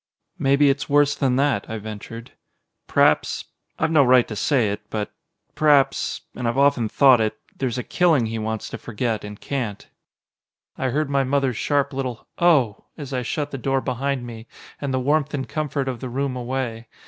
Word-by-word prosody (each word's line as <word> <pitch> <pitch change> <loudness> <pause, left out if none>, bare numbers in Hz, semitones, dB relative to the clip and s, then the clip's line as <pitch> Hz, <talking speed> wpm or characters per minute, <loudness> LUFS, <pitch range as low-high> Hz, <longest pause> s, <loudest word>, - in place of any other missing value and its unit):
"Maybe 140 +1 +4
it's 145 +2 -4
worse 145 0 +4
than 130 -3 +1
that," 140 0 +1
I 110 - -3
ventured. 110 +3 -8 0.6
"P'r'aps - - +2 0.3
I've 160 +1 0
no 155 -3 +6
right 125 -1 +5
to 110 - -5
say 120 -2 +2
it 105 +1 -4
but 105 -1 -3 0.4
p'r'aps, 145 -3 +2
and 120 -1 -3
I've 115 - -1
often 140 -5 +3
thought 130 -2 +5
it, 110 0 -1 0.2
there's 130 -3 -2
a 125 - -2
killing 165 -9 +2
he 110 0 -3
wants 110 0 -3
to - - -7
forget, 115 -1 -2
and 105 0 -8
can't!" 120 -8 -4 0.9
I 130 - -1
heard 145 +2 -1
my 140 -1 +2
mother's 135 -3 0
sharp 140 -1 0
little 130 -3 -4
"Oh!" 145 -12 +3
as 140 -3 -7
I 125 - 0
shut 145 +5 -3
the 135 - -5
door 135 +2 +1
behind 130 +1 -2
me 115 -1 -9 0.3
and 140 -2 -2
the 130 - 0
warmth 145 +2 +1
and 135 -2 -3
comfort 140 +2 -2
of 125 -3 -3
the 130 - -5
room 135 +1 -2
away. 120 -2 -3
130 Hz, 185 wpm, -23 LUFS, 115-140 Hz, 0.9 s, no